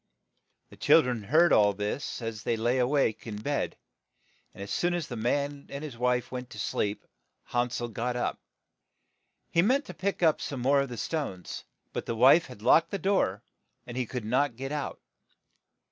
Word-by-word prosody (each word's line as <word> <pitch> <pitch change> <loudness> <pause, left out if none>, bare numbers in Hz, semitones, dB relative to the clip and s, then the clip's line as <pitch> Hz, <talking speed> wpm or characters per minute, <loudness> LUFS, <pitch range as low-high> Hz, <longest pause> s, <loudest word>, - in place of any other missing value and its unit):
The - - -14
chil - - +6
dren 125 -3 -2
had 100 - -13
heard 165 +4 +5
all 105 -1 +5
this 105 +6 -4
as 115 -2 -4
they 115 +1 0
lay 120 +3 +1
a 125 - +3
wake 135 -6 +1
in 110 - -4
bed; 145 +6 -2 0.7
and 100 - -8
as 100 - -7
soon 175 0 +1
as 170 -3 -2
the 125 - -6
man 140 +5 -1
and 140 +2 -6
his 145 -6 -6
wife 125 +1 0
went 125 -1 -5
to 105 - -10
sleep, 105 -1 -2 0.4
Han 120 0 +1
sel 120 0 -3
got 120 +2 -3
up. 125 - -1
,^ - - -44 1.1
He 170 - +4
meant 260 - +2
to 180 - -8
pick 185 +2 -2
up 160 -2 +4
some 140 - -4
more 140 +3 +3
of 140 - -3
the 120 - -6
small 155 +7 -1
stones; 90 - -8 0.3
but - - -4
the 115 - -1
wife 135 +8 +6
had 115 -5 -12
locked 165 +7 +5
the 200 - -2
door, 190 - +1 0.4
and 120 - -8
he 125 -2 -1
could 125 -2 -5
not 125 +3 +1
get 135 +3 -5
PH; - - -4
out. 145 - -5
125 Hz, 210 wpm, -28 LUFS, 115-145 Hz, 1.1 s, chil